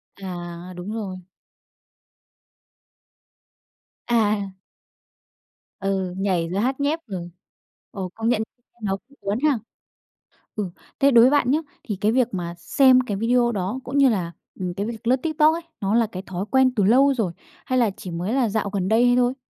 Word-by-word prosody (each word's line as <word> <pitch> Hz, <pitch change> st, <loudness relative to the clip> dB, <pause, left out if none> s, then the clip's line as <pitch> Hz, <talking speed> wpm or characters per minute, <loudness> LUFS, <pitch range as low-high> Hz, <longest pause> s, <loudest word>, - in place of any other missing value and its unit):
À, 175 Hz, -2 st, -7 dB
đúng 180 Hz, +4 st, -6 dB
rồi. 195 Hz, -5 st, -4 dB, 2.9 s
À. 210 Hz, -4 st, +1 dB, 1.3 s
Ừ, 190 Hz, -2 st, -1 dB
nhảy 180 Hz, -4 st, 0 dB
rồi 195 Hz, +3 st, -1 dB
hát 265 Hz, +3 st, 0 dB
nhép, 295 Hz, +3 st, +1 dB
ừ, 175 Hz, -3 st, -5 dB, 0.6 s
ồ, 190 Hz, -3 st, -5 dB
công 225 Hz, +1 st, -1 dB
nhận 230 Hz, -3 st, +2 dB, 0.4 s
nó 195 Hz, -1 st, 0 dB
cũng 280 Hz, -, -23 dB
cuốn 200 Hz, +4 st, -1 dB
ha. 285 Hz, -7 st, +3 dB, 1.0 s
Ừ, 205 Hz, -4 st, -2 dB, 0.3 s
thế 280 Hz, 0 st, +5 dB
đối 235 Hz, -1 st, +8 dB
với 260 Hz, -, +6 dB
bạn 270 Hz, -3 st, +3 dB
nhá, 305 Hz, -, +3 dB, 0.2 s
thì 210 Hz, -, -3 dB
cái 215 Hz, +1 st, +3 dB
việc 250 Hz, -1 st, +3 dB
mà 170 Hz, -2 st, -3 dB
xem 260 Hz, +6 st, +5 dB
cái 205 Hz, -6 st, -3 dB
video 240 Hz, +2 st, +2 dB
đó 205 Hz, +5 st, -2 dB
cũng 270 Hz, +2 st, -3 dB
như 275 Hz, -2 st, +6 dB
là, 180 Hz, -6 st, -1 dB, 0.3 s
ừm, 180 Hz, -1 st, -3 dB
cái 200 Hz, +2 st, -3 dB
việc 230 Hz, 0 st, -6 dB
lướt 255 Hz, -, +5 dB
TikTok 310 Hz, 0 st, +4 dB
ấy, 335 Hz, -, -3 dB, 0.2 s
nó 200 Hz, +3 st, +1 dB
là 230 Hz, -2 st, +3 dB
cái 185 Hz, +1 st, -6 dB
thói 190 Hz, +2 st, -4 dB
quen 260 Hz, -1 st, +4 dB
từ 205 Hz, -, +2 dB
lâu 270 Hz, +7 st, +5 dB
rồi, 205 Hz, -9 st, -1 dB, 0.3 s
hay 255 Hz, -1 st, +1 dB
là 230 Hz, -3 st, +3 dB
chỉ 180 Hz, -, -7 dB
mới 180 Hz, +7 st, -2 dB
là 255 Hz, -5 st, +2 dB
dạo 205 Hz, -1 st, -1 dB
gần 190 Hz, -2 st, -2 dB
đây 245 Hz, +2 st, +4 dB
thôi? 250 Hz, +2 st, +2 dB
215 Hz, 175 wpm, -23 LUFS, 190-255 Hz, 2.9 s, đối